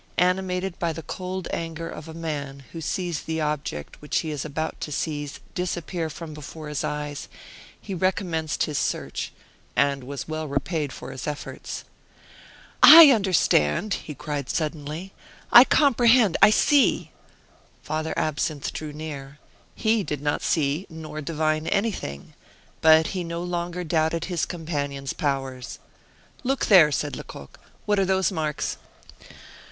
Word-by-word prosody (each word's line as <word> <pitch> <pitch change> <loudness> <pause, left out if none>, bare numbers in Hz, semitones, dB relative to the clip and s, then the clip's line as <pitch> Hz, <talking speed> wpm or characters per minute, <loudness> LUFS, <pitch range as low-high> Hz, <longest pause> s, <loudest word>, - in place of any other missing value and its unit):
Animated 180 0 0
by 170 -1 0
the 165 +1 -7
cold 185 +1 -5
anger 165 0 -4
of 155 - -8
a 160 - -8
man 145 -4 -5
who 165 - -7
sees 175 0 -2
the 160 0 -3
object 150 - -3
which 150 - 0
he 160 - -4
was 145 -2 -3
about 155 +1 -4
to 150 - -4
seize 145 -1 -3
disappear 175 -2 -3
from 160 0 -8
before 150 +1 -8
his 150 - -2
eyes, 150 -1 -4 0.5
he 200 - -7
recommenced 175 -4 0
his 150 -2 -1
search, - - -2 0.4
and 140 -1 +2
was 140 +2 -6
well 155 0 -3
repaid 145 +1 -2
for 130 - -8
his 130 0 -6
efforts. 145 -1 -6 1.0
"I 320 -2 +12
understand!" 190 - +2
he 150 - -5
cried 145 -2 -4
suddenly, 155 +3 -3 0.4
"I 240 - +11
comprehend 245 - +4
I - - +9
see!" 285 +5 +3 0.7
Father 155 +1 -3
Absinthe 155 -1 -1
drew 155 -1 -6
near. 145 -2 -7 0.4
He 220 -1 +2
did 150 -5 -3
not 145 - 0
see 150 +3 0
nor 155 -2 -7
divine 155 +1 -1
anything! 195 - -2 0.5
but 160 0 +6
he 185 -2 -2
no 170 0 -4
longer 175 0 -3
doubted 160 0 0
his 175 -3 -1
companion's 145 -5 -3
powers. 135 -3 -3 0.7
"Look 270 +1 0
there," 175 -7 +7
said 145 -1 -1
Lecoq; - - -10 0.3
"what 205 -1 +2
are 195 - +3
those 190 0 +2
marks?" 155 -4 -2
160 Hz, 140 wpm, -25 LUFS, 150-180 Hz, 1.0 s, I